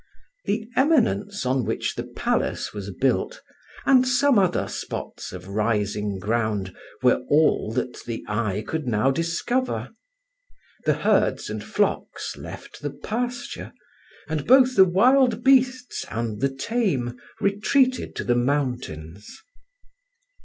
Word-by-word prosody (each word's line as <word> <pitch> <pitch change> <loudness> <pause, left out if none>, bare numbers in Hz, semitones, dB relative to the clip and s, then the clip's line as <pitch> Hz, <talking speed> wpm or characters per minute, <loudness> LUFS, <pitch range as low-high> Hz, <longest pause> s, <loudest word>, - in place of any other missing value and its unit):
The 220 +2 -1
eminence 225 - +2
on 130 0 +1
which 110 +1 -2
the - - -4
palace - - -2
was 100 -1 -6
built, 135 - 0 0.5
and 255 -1 +5
some 255 -1 +4
other 185 -2 +1
spots - - -6
of 90 0 -9
rising 105 -1 -1
ground, 105 -2 -1 0.3
were 125 -1 +4
all 150 -7 +3
that 125 0 -3
the 115 -1 -5
eye 105 -1 -1
could 160 -4 -3
now 115 +3 +2
discover. 170 - -1 0.9
The - - +3
herds - - +1
and - - -5
flocks - - -1
left - - -10
the - - -2
pasture, 245 +2 -4 0.5
and 155 -2 -3
both 255 0 +6
the 190 - +8
wild 240 +5 +3
beasts 255 -1 +3
and 115 -1 -3
the 135 - +2
tame 135 - -1 0.2
retreated 255 +6 +1
to - - -3
the 120 - +2
mountains. 120 - -2
145 Hz, 125 wpm, -24 LUFS, -, 0.9 s, the